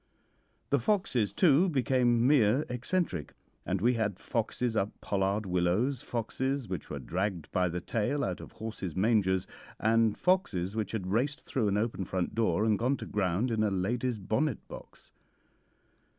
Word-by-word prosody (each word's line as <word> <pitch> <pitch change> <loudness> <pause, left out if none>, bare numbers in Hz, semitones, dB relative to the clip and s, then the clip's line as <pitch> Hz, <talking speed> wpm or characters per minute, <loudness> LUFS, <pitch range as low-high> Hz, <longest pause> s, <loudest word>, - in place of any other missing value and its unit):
The - - +4
foxes, 155 - +1
too, 165 - +4
became 125 -4 +2
mere 130 0 +4
eccentric, 125 - -2 0.3
and 95 0 0
we 120 +4 +4
had 105 -5 -1
foxes 115 0 -2
up 105 -1 -1
pollard 100 +1 0
willows, 95 +9 +1
foxes 130 +2 -2
which 90 -5 -5
were - - -4
dragged 90 -3 -3
by 90 -1 +1
the 85 +1 -3
tail 120 +10 -1
out 90 -2 -2
of - - -11
horses' 110 -6 -6
mangers, 95 -2 +2 0.3
and 110 0 +3
foxes 105 - +1
which 110 -1 -2
had 95 -4 -3
raced 145 +8 0
through 120 -6 0
an 100 0 +1
open 105 -3 -1
front 90 -1 -2
door 110 -2 +1
and 105 -3 +2
gone 130 +4 +1
to - - -7
ground 105 +4 0
in 110 -1 +1
a 110 - +3
lady's 115 +6 -1
bonnet 110 +7 -1
box. - - -12
110 Hz, 160 wpm, -30 LUFS, 95-125 Hz, 0.3 s, The